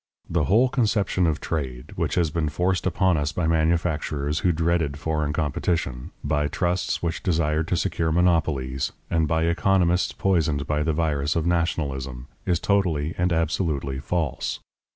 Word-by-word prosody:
The 80 -3 +1
whole 115 - +4
conception 105 - +1
of 80 -1 0
trade, 65 -6 -4
which - - -1
has 85 -3 +1
been 80 -1 0
forced 90 +4 0
upon 95 -1 +2
us 75 0 -1
by 80 +2 -1
manufacturers 80 -2 0
who 90 - +2
dreaded 80 -3 0
foreign 75 -1 -1
competition, 75 -3 -1
by 75 0 +1
trusts 90 +4 -1
which 85 -1 -2
desired 80 -2 +1
to 90 - 0
secure 80 0 0
monopolies, 80 -7 +1 0.2
and 80 -2 +2
by 80 0 +1
economists 90 +1 +2
poisoned 80 -7 +1
by 75 +2 0
the 80 +1 +1
virus 75 -2 0
of 85 -1 0
nationalism, 70 -7 -1 0.2
is 85 -2 +2
totally 85 -6 +1
and 90 0 +2
absolutely 80 -5 0
false. 75 0 -2
80 Hz, 150 wpm, -24 LUFS, 75-85 Hz, 0.2 s, whole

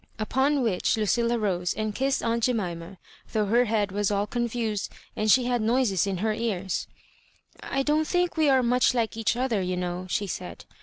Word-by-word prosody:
Upon 265 +5 +1
which 220 -1 +1
Lucilla 235 +3 +1
rose 180 -5 -1
and 215 0 -2
kissed 270 +4 0
aunt 230 0 +1
Jemi* 210 -9 -1
ma, 170 +3 -10 0.4
though 215 -1 +1
h6r 235 +4 +3
head 210 -2 0
was 205 0 0
all 205 0 0
confused 230 -2 -2 0.2
and 215 0 0
she 250 +3 +5
had 245 -1 0
noises 220 -4 +2
in 195 -2 -1
her 215 - +2
ears. 200 -5 -2 0.7
I 270 0 -1
don^t 300 +2 +1
think 355 0 0
we 310 -3 +3
are 260 -2 +4
much 250 +1 +3
like 230 -3 0
each 225 0 0
other, 240 -5 0
you 180 0 -2
know," 180 0 -3
she 205 - 0
said. 190 - -6
225 Hz, 195 wpm, -26 LUFS, 200-250 Hz, 0.7 s, she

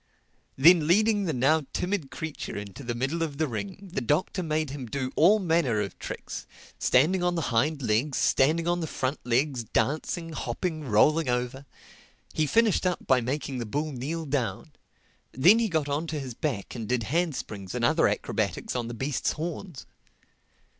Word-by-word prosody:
Then 160 +2 +6
leading 205 +3 +3
the 165 - 0
now 140 +3 +2
timid 180 -6 -2
creature 160 -8 -6
into 100 +7 -8
the 120 -1 -3
middle 135 +7 -1
of 150 -4 -2
the 160 0 +1
ring, 195 - -6
the - - -1
Doctor 150 - 0
made 155 -3 -1
him 135 -3 -6
do 130 +2 -3
all 185 +8 +6
manner 165 - +1
of 100 -2 -4
tricks: - - -6 0.3
standing 160 +9 +3
on 175 0 +1
the 165 -5 -2
hind 140 +5 +1
legs, 120 +5 +1
standing 160 +5 +2
on 175 0 +1
the 165 - -3
front 130 0 -2
legs, 125 +1 +1
dancing, 155 +9 -1
hopping, 155 +4 -3
rolling 140 +6 +3
over. 125 +3 -2 0.7
He 155 -1 +1
finished 225 -1 +3
up 180 - -2
by 130 -2 +4
making 130 +1 -3
the 120 - -3
bull 150 +7 -2
kneel 150 +6 -4
down; 130 -2 -2 0.6
then 175 - +6
he 230 -2 +1
got 160 -4 0
on 145 +3 -2
to 155 -1 -3
his 130 -3 -6
back 120 -5 -3
and 115 -4 -6
did 125 -2 +1
handsprings 125 - -2
and - - +1
other - - +4
acrobatics - - -2
on 120 -2 -2
the 120 - -6
beast's 135 +2 -1
horns. 165 -1 -6
145 Hz, 175 wpm, -27 LUFS, 125-165 Hz, 0.7 s, Then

